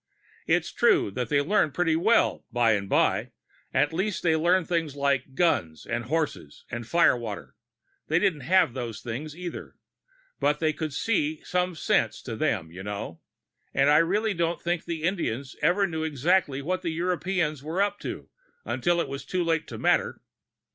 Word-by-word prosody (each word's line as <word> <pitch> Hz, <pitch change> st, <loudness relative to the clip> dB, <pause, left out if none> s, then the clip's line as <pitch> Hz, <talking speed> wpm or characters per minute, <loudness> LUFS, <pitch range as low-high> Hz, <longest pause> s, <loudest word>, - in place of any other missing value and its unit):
It's -, -, +1 dB
true -, -, +3 dB
that 125 Hz, +4 st, -3 dB
they 140 Hz, -1 st, +3 dB
learned 155 Hz, -3 st, +1 dB
pretty 165 Hz, -2 st, +2 dB
well, 210 Hz, +8 st, +2 dB
by 120 Hz, -2 st, +3 dB
and 100 Hz, -2 st, 0 dB
by -, -, +2 dB, 0.4 s
at 145 Hz, +2 st, +2 dB
least 185 Hz, -1 st, -1 dB
they 165 Hz, -2 st, +3 dB
learned 175 Hz, +2 st, +2 dB
things 165 Hz, -5 st, -1 dB
like 140 Hz, -2 st, 0 dB
guns 85 Hz, -, +1 dB
and 120 Hz, 0 st, -3 dB
horses 150 Hz, -, -3 dB
and 120 Hz, -2 st, -5 dB
firewater; 120 Hz, -11 st, +1 dB, 0.5 s
they 160 Hz, -, +2 dB
didn't 180 Hz, -4 st, +2 dB
have 180 Hz, -1 st, +3 dB
those 120 Hz, -4 st, -5 dB
things, 145 Hz, +7 st, -6 dB
either, 180 Hz, -1 st, -7 dB, 0.6 s
but 150 Hz, +1 st, +2 dB
they 155 Hz, -1 st, +1 dB
could 155 Hz, 0 st, -4 dB
see 155 Hz, -2 st, -1 dB
some 180 Hz, -1 st, -1 dB
sense -, -, 0 dB
to -, -, -5 dB
them, 80 Hz, 0 st, -1 dB
you 90 Hz, +3 st, -9 dB
know. 100 Hz, -4 st, -6 dB, 0.5 s
But 135 Hz, +1 st, +4 dB
I 150 Hz, +1 st, +6 dB
really 205 Hz, +6 st, +1 dB
don't 170 Hz, -1 st, -1 dB
think 175 Hz, -1 st, -2 dB
the 165 Hz, -2 st, -4 dB
Indians 140 Hz, -, -2 dB
ever 195 Hz, +3 st, +3 dB
knew 160 Hz, -4 st, -3 dB
exactly 150 Hz, -1 st, +1 dB
what 185 Hz, +4 st, -1 dB
the 170 Hz, -, -2 dB
Europeans 175 Hz, -2 st, -1 dB
were 160 Hz, +5 st, -4 dB
up 205 Hz, 0 st, +1 dB
to, -, -, -6 dB, 0.4 s
until 175 Hz, 0 st, +1 dB
it -, -, -3 dB
was 140 Hz, 0 st, -6 dB
too 180 Hz, +6 st, -1 dB
late 165 Hz, -2 st, 0 dB
to -, -, -7 dB
matter. -, -, +1 dB
160 Hz, 175 wpm, -26 LUFS, 135-175 Hz, 0.6 s, I